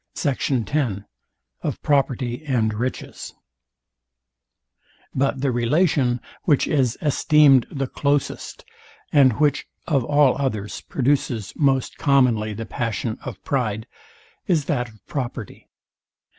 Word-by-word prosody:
Sect, 140 Hz, -5 st, -1 dB
2. 125 Hz, -5 st, 0 dB
SECT. 120 Hz, -, -13 dB
X 120 Hz, -10 st, 0 dB, 0.6 s
OF -, -, -3 dB
PROPERTY 130 Hz, -2 st, 0 dB
AND 115 Hz, -5 st, +1 dB
RICHES 125 Hz, +4 st, -5 dB, 1.8 s
But 135 Hz, 0 st, 0 dB
the 135 Hz, -2 st, +1 dB
relation, 125 Hz, 0 st, +2 dB, 0.3 s
which 145 Hz, -5 st, +3 dB
is 130 Hz, -5 st, +1 dB
esteemed 145 Hz, -3 st, +5 dB
the 135 Hz, -1 st, -2 dB
closest, 140 Hz, +2 st, -2 dB, 0.5 s
and 135 Hz, -4 st, +6 dB
which 145 Hz, -2 st, +2 dB, 0.2 s
of 140 Hz, -6 st, +1 dB
all 145 Hz, 0 st, +4 dB
others 110 Hz, -7 st, -3 dB
produces 125 Hz, -5 st, 0 dB
most 135 Hz, -3 st, +1 dB
commonly 125 Hz, -6 st, +3 dB
the 115 Hz, +2 st, -5 dB
passion 115 Hz, -1 st, -3 dB
of -, -, -8 dB
pride, 110 Hz, -5 st, -1 dB, 0.6 s
is 165 Hz, -7 st, +2 dB
that 125 Hz, -6 st, -1 dB
of 110 Hz, -2 st, -21 dB
property. 120 Hz, -6 st, -6 dB
130 Hz, 115 wpm, -22 LUFS, 115-145 Hz, 1.8 s, and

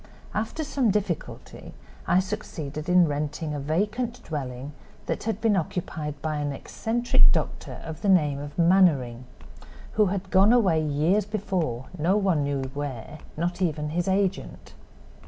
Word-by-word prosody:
After 225 Hz, +9 st, -2 dB
some 275 Hz, -5 st, +1 dB
difficulty 195 Hz, -5 st, -3 dB, 0.3 s
I -, -, +4 dB
succeeded 165 Hz, -6 st, -5 dB
in 180 Hz, -1 st, +6 dB
renting 150 Hz, +1 st, -3 dB
a 145 Hz, -, -3 dB
vacant 210 Hz, -, -1 dB
dwelling 135 Hz, -2 st, -5 dB, 0.3 s
that -, -, -3 dB
had 220 Hz, -2 st, -1 dB
been 225 Hz, -2 st, +3 dB
occupied 155 Hz, -4 st, -3 dB
by 155 Hz, -1 st, -1 dB
an 145 Hz, -1 st, -1 dB
eccentric 230 Hz, -, +2 dB
doctor -, -, -3 dB
of 160 Hz, -1 st, -7 dB
the 205 Hz, -, +1 dB
name 150 Hz, -7 st, +4 dB
of 145 Hz, 0 st, -8 dB
Mannering, 165 Hz, -9 st, +3 dB, 0.7 s
who 215 Hz, -1 st, +3 dB
had 190 Hz, 0 st, -3 dB
gone 195 Hz, +3 st, +6 dB
away 190 Hz, -10 st, +4 dB
years 155 Hz, +8 st, +2 dB
before, 185 Hz, -, -2 dB
no 180 Hz, +6 st, +3 dB
one 190 Hz, -8 st, +2 dB
knew 140 Hz, -1 st, -1 dB
where, 145 Hz, 0 st, -5 dB, 0.2 s
not 175 Hz, +3 st, -2 dB
even 150 Hz, -4 st, 0 dB
his 175 Hz, +3 st, -1 dB
agent. 195 Hz, 0 st, -1 dB
170 Hz, 145 wpm, -26 LUFS, 145-200 Hz, 0.7 s, in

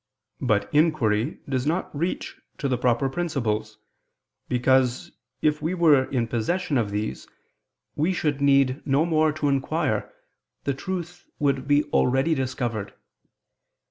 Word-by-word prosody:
But -, -, +1 dB
inquiry 145 Hz, -6 st, +2 dB
does 130 Hz, 0 st, -1 dB
not 170 Hz, 0 st, -1 dB
reach 170 Hz, +5 st, -3 dB, 0.2 s
to 140 Hz, -, -2 dB
the 130 Hz, -, +1 dB
proper 125 Hz, +1 st, +1 dB
principles: 125 Hz, -9 st, -2 dB, 0.7 s
because, 125 Hz, 0 st, +2 dB, 0.3 s
if 150 Hz, 0 st, +2 dB
we 165 Hz, +4 st, -1 dB
were 155 Hz, -6 st, +5 dB
in 120 Hz, -4 st, -1 dB
possession 140 Hz, +6 st, 0 dB
of 110 Hz, -3 st, -1 dB
these, 105 Hz, -8 st, -4 dB, 0.7 s
we 160 Hz, +5 st, +1 dB
should 150 Hz, -5 st, -1 dB
need 140 Hz, -1 st, +3 dB
no 140 Hz, +3 st, +2 dB
more 155 Hz, -2 st, +2 dB
to 155 Hz, -1 st, -1 dB
inquire, 140 Hz, -1 st, 0 dB, 0.5 s
the 140 Hz, -, 0 dB
truth 175 Hz, +4 st, -6 dB
would 140 Hz, -2 st, 0 dB
be 145 Hz, +1 st, +4 dB
already 135 Hz, +6 st, +3 dB
discovered. 120 Hz, -7 st, -3 dB
140 Hz, 130 wpm, -25 LUFS, 125-155 Hz, 0.7 s, were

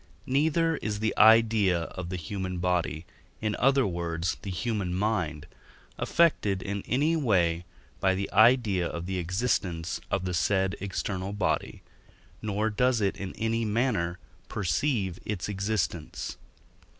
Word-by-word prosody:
neither 160 Hz, +4 st, +2 dB
is 105 Hz, -1 st, -3 dB
the 110 Hz, 0 st, 0 dB
idea 110 Hz, -5 st, +5 dB
of 85 Hz, +1 st, -6 dB
the 95 Hz, -, -3 dB
human 90 Hz, +2 st, -4 dB
body, 85 Hz, -3 st, -1 dB, 0.3 s
in 110 Hz, -1 st, -1 dB
other 135 Hz, 0 st, +4 dB
words, 85 Hz, -2 st, -2 dB
the 100 Hz, -, -6 dB
human 95 Hz, -2 st, -2 dB
mind, 90 Hz, -7 st, -1 dB, 0.5 s
affected 105 Hz, -, +2 dB
in 100 Hz, 0 st, -3 dB
any 145 Hz, +7 st, +2 dB
way 90 Hz, -, +2 dB, 0.3 s
by 95 Hz, 0 st, +2 dB
the 100 Hz, +1 st, -2 dB
idea 110 Hz, -5 st, +4 dB
of 85 Hz, 0 st, -5 dB
the 95 Hz, 0 st, -2 dB
existence 90 Hz, -2 st, -1 dB
of 95 Hz, -1 st, -1 dB
the 90 Hz, -, -2 dB
said 95 Hz, +2 st, +1 dB
external 95 Hz, 0 st, -3 dB
body, 80 Hz, -7 st, -1 dB, 0.6 s
nor 110 Hz, +1 st, -1 dB
does 125 Hz, +3 st, +2 dB
it 100 Hz, -2 st, +1 dB
in 95 Hz, -2 st, -6 dB
any 115 Hz, +1 st, 0 dB
manner 105 Hz, -6 st, 0 dB, 0.3 s
perceive 100 Hz, -, 0 dB
its 105 Hz, -4 st, -3 dB
existence. 100 Hz, -5 st, -2 dB
100 Hz, 135 wpm, -28 LUFS, 90-110 Hz, 0.6 s, idea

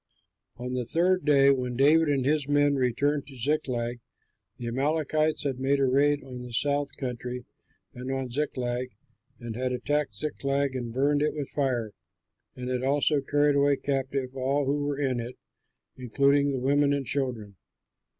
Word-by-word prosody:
On 125 Hz, +1 st, -5 dB
the 125 Hz, -1 st, -1 dB
third 175 Hz, +7 st, +1 dB
day, 140 Hz, -2 st, +6 dB
when 125 Hz, -2 st, -1 dB
David 150 Hz, +4 st, +4 dB
and 135 Hz, -3 st, +1 dB
his 145 Hz, 0 st, +1 dB
men 145 Hz, 0 st, +3 dB
returned 140 Hz, +2 st, 0 dB
to 135 Hz, -2 st, -11 dB
Ziklag, 120 Hz, -3 st, -1 dB, 0.6 s
the 120 Hz, -, -7 dB
Amalekites 155 Hz, +5 st, 0 dB
had 135 Hz, -3 st, -2 dB
made 135 Hz, +1 st, +1 dB
a 135 Hz, -, +3 dB
raid 145 Hz, +2 st, +2 dB
on 125 Hz, -2 st, -8 dB
the 125 Hz, 0 st, -8 dB
South 145 Hz, +3 st, 0 dB
Country 125 Hz, -1 st, -5 dB, 0.5 s
and 125 Hz, +2 st, -6 dB
on 135 Hz, -2 st, -3 dB
Ziklag, 125 Hz, -2 st, -2 dB, 0.5 s
and 120 Hz, -2 st, -6 dB
had 130 Hz, +1 st, -1 dB
attacked 145 Hz, -1 st, -1 dB
Ziklag 140 Hz, +1 st, -1 dB
and 120 Hz, -2 st, -4 dB
burned 145 Hz, +4 st, +1 dB
it 150 Hz, 0 st, 0 dB
with 145 Hz, -3 st, -4 dB
fire, 125 Hz, -6 st, -1 dB, 0.6 s
and 125 Hz, 0 st, -6 dB
had 125 Hz, -1 st, -1 dB
also 145 Hz, +2 st, +2 dB
carried 145 Hz, +1 st, +2 dB
away 140 Hz, 0 st, +4 dB
captive 135 Hz, -1 st, -2 dB
all 135 Hz, +2 st, 0 dB
who 145 Hz, +2 st, 0 dB
were 145 Hz, -1 st, -2 dB
in 130 Hz, -4 st, 0 dB
it, 120 Hz, +2 st, -6 dB, 0.6 s
including 140 Hz, +3 st, +2 dB
the 135 Hz, -, -1 dB
women 140 Hz, +2 st, +2 dB
and 140 Hz, -1 st, -1 dB
children. 120 Hz, -6 st, -2 dB
135 Hz, 165 wpm, -27 LUFS, 125-145 Hz, 0.6 s, day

